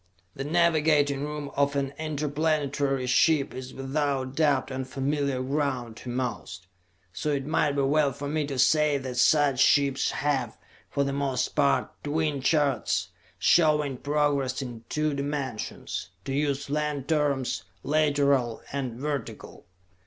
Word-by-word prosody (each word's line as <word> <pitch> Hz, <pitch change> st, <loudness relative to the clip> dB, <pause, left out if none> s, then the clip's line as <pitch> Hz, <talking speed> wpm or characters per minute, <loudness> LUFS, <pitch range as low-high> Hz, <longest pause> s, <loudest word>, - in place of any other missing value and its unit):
The 135 Hz, -, -5 dB
navigating 150 Hz, -3 st, +2 dB
room 150 Hz, -1 st, -5 dB
of 140 Hz, 0 st, +1 dB
an 140 Hz, -1 st, -1 dB
interplanetary 145 Hz, -3 st, -1 dB
ship 140 Hz, +3 st, +3 dB
is 130 Hz, 0 st, -7 dB
without 135 Hz, -1 st, -2 dB
doubt 145 Hz, -4 st, +2 dB
unfamiliar 135 Hz, +1 st, -2 dB
ground 130 Hz, -4 st, -2 dB
to 125 Hz, -, -8 dB
most, 105 Hz, -8 st, -4 dB, 0.5 s
so 150 Hz, -, -3 dB
it 140 Hz, -2 st, -1 dB
might 150 Hz, -1 st, +1 dB
be 140 Hz, -1 st, +1 dB
well 145 Hz, +1 st, +3 dB
for 145 Hz, +2 st, -6 dB
me 150 Hz, 0 st, -1 dB
to 140 Hz, -2 st, -4 dB
say 150 Hz, +2 st, +4 dB
that 130 Hz, -2 st, -6 dB
such 140 Hz, +1 st, +4 dB
ships 140 Hz, -1 st, +3 dB
have, 140 Hz, -4 st, -1 dB, 0.3 s
for 140 Hz, -, 0 dB
the 140 Hz, 0 st, -2 dB
most 135 Hz, -3 st, 0 dB
part, 140 Hz, -, +1 dB
twin 150 Hz, -1 st, -1 dB
charts, 145 Hz, 0 st, +1 dB, 0.3 s
showing 150 Hz, -4 st, +3 dB
progress 145 Hz, -2 st, 0 dB
in 120 Hz, -3 st, -8 dB
two 150 Hz, 0 st, 0 dB
dimensions; 140 Hz, -9 st, -4 dB, 0.2 s
to 135 Hz, -, -3 dB
use 140 Hz, 0 st, -1 dB
land 150 Hz, -2 st, -1 dB
terms, 140 Hz, -8 st, 0 dB, 0.2 s
lateral 140 Hz, -5 st, +2 dB
and 130 Hz, -4 st, -3 dB
vertical. 140 Hz, -9 st, -5 dB
140 Hz, 135 wpm, -27 LUFS, 130-150 Hz, 0.5 s, say